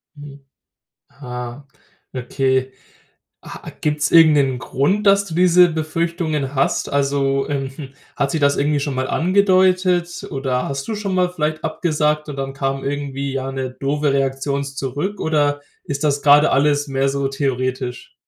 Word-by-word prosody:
Mhm, 145 -1 -12 0.7
ah, 125 0 -8 0.5
okay. 130 0 -1 0.7
A - - -9
gibt's 150 0 0
irgend 165 -2 +7
'nen 135 -3 +2
Grund, 190 - 0
dass 200 0 +4
du 165 -5 -7
diese 180 0 +6
Befürchtungen 160 -3 -2
hast? 135 - +1
Also, 140 -1 +1
ähm, 135 -2 -2
hm, 140 -3 -8 0.3
hat 140 - 0
sich 160 - -1
das 140 -1 +3
irgendwie 145 +1 +1
schon 140 -1 -3
mal 130 0 -2
angedeutet? 185 -1 +2
Oder 135 -2 -1
hast 135 0 -4
du 220 - -2
schon 205 -2 -3
mal 180 -1 +2
vielleicht 155 -3 -2
abgesagt 150 -2 -1
und 140 - -6
dann 135 0 -4
kam 135 0 -3
irgendwie, 140 -1 -3
ja, 135 0 -3
'ne 130 -1 -4
doofe 140 +2 -1
Reaktion 135 +1 -1
s 140 0 -7
zurück? 145 +10 -3
Oder 145 -2 +1 0.2
ist 140 +2 -3
das 145 -1 +1
grade 145 +1 +5
alles 145 +1 +2
mehr 135 0 0
so 140 0 -1
theoretisch? 130 -2 -3
140 Hz, 160 wpm, -20 LUFS, 135-155 Hz, 0.7 s, irgend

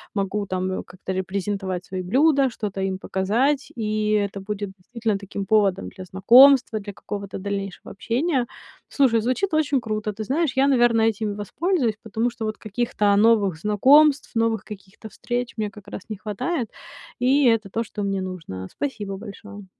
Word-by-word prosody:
могу 200 0 -1
там, 185 0 -2
э, - - -6
как-то 185 +1 -8
репрезентовать 190 0 -3
свои 185 0 -4
блюда, 270 - +3
что-то 205 -4 -5
им 190 0 -1
показать, 230 +10 0
и 215 -2 -1
это 200 -1 0
будет 205 0 -4
действительно 220 +2 -2
таким 200 0 -6
поводом 200 -2 +2
для 185 -1 -10
знакомства, 235 +6 +6
для 205 0 -8
какого-то 200 0 -6
дальнейшего 195 -1 -5
общения. 255 - -1 0.4
Слушай, 245 -5 +2
звучит 255 - -1
очень 285 -4 +2
круто. 215 -1 -3
Ты 215 +2 -5
знаешь, 285 +7 0
я, 270 +1 +4
наверное, 240 -4 +4
этим 215 -1 -3
и - - -5
воспользуюсь, 245 - -1
потому 225 +2 -1
что 230 -1 -6
вот 215 0 -3
каких-то 210 -2 0
новых 205 -4 +3
знакомств, 270 - +4
новых 225 -2 +1
каких-то 205 +1 -11
встреч 245 +4 -4
мне 215 -1 -1
как 205 0 -15
раз 205 - -7
не 215 - -3
хватает. 220 - -3 0.5
И 265 +3 +3
это 225 -3 +2
то, 230 +4 -2
что 210 -2 -6
мне 195 -1 -1
нужно. 165 - -6
Спасибо 210 -8 -4
большое. 205 0 -10
215 Hz, 165 wpm, -23 LUFS, 195-240 Hz, 0.5 s, знакомства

